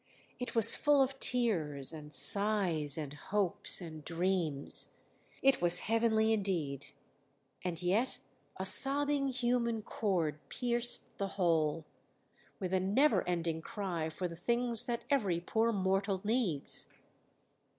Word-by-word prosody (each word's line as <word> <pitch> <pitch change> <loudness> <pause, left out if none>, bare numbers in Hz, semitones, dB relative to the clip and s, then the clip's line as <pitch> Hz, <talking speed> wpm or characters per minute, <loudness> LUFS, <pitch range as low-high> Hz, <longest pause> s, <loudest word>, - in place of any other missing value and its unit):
It 250 - -6
was 225 -2 +7
full 290 -2 +3
of 270 0 -5
tears, 165 - +1
and 150 -1 -10
sighs, 185 -8 +3
and 150 -3 -5
hopes, 190 +4 +2
and 155 -3 -9
dreams; 165 -4 0 0.6
it 270 -6 +3
was 175 -1 +2
heavenly 225 0 +1
indeed, 165 -10 -2 0.8
and 175 -3 -3
yet 210 +9 0 0.4
a 190 - -4
sobbing 275 +7 +3
human 240 -3 -1
chord 170 -10 -2
pierced 240 -1 0
the 200 - -1
whole, 165 -3 0 0.7
with 185 -2 -4
a 190 - +2
never 210 +11 +2
ending 165 -2 -2
cry 175 -5 -4
for 180 +3 -4
the 170 - -9
things 235 +5 +1
that 235 -1 -3
every 200 -12 +1
poor 225 +6 0
mortal 195 -1 -1
needs. 210 - 0
195 Hz, 125 wpm, -32 LUFS, 165-235 Hz, 0.8 s, was